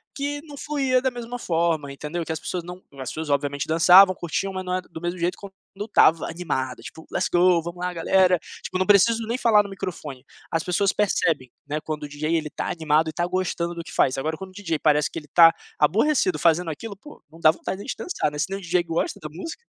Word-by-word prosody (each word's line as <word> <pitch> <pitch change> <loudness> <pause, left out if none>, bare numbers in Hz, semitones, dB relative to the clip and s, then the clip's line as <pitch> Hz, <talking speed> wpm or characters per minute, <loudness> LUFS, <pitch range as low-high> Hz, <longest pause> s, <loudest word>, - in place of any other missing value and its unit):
que 290 +1 -3
não 290 -3 -11
fluía 270 -4 0
da 260 0 0
mesma 240 0 -6
forma, 165 -8 0
entendeu? 150 +5 -5
Que - - -4
as 160 - -3
pessoas 175 +1 -4
não 180 +1 -9
as 130 -2 -6
pessoas 160 -1 -5
obviamente 145 0 -1
dançavam, 180 +4 +7
curtiam, 180 +3 -3
mas 185 0 -4
não 180 0 -1
é 185 - -1
do 165 -3 -11
mesmo 175 +1 -3
jeito 175 +1 -1
quando 200 -1 -11 0.2
eu 205 +2 -5
estava 165 -6 +4
animado 145 -7 -3
tipo: 160 - -11
"Let's - - 0
go! 175 -1 +4
vamos 170 +2 -7
lá 180 - -2
galera!". 180 +1 +3 0.2
Tipo, 185 - -3
não 185 - +1
preciso 220 +2 +4
nem 235 - -1
falar 225 -4 +5
no 200 - -9
microfone, 150 -9 -7 0.2
as 165 -1 -1
pessoas 195 +2 +1
percebem, 160 - 0 0.2
né, 150 +1 -3
quando 155 -1 -5
o - - -4
DJ 155 +3 -1
ele 155 -2 -3
tá - - -4
animado 160 -1 +1
e 155 - -7
tá 175 - -1
gostando 175 -2 -2
do 170 - -6
que - - -11
faz. 130 - +2
Agora 155 +4 -2
quando 190 +2 -9
o - - -21
DJ 175 -6 -3
parece 150 -2 +2
que - - -5
ele 150 - -16
tá 165 +1 +7 0.2
aborrecido 295 - +2
fazendo 170 0 +2
aquilo, 200 +7 -7
pô, 295 +9 -14
não 165 - -16
dá 155 - +7
vontade 185 +3 -5
nem - - -8
de - - -2
dançar, 150 - -2
né, 150 - -7
se - - 0
nem 195 - -3
o - - -12
DJ 175 -1 +1
gosta 165 0 -2
da 155 - -5
música. 325 - -8
175 Hz, 245 wpm, -24 LUFS, 155-195 Hz, 0.2 s, dançavam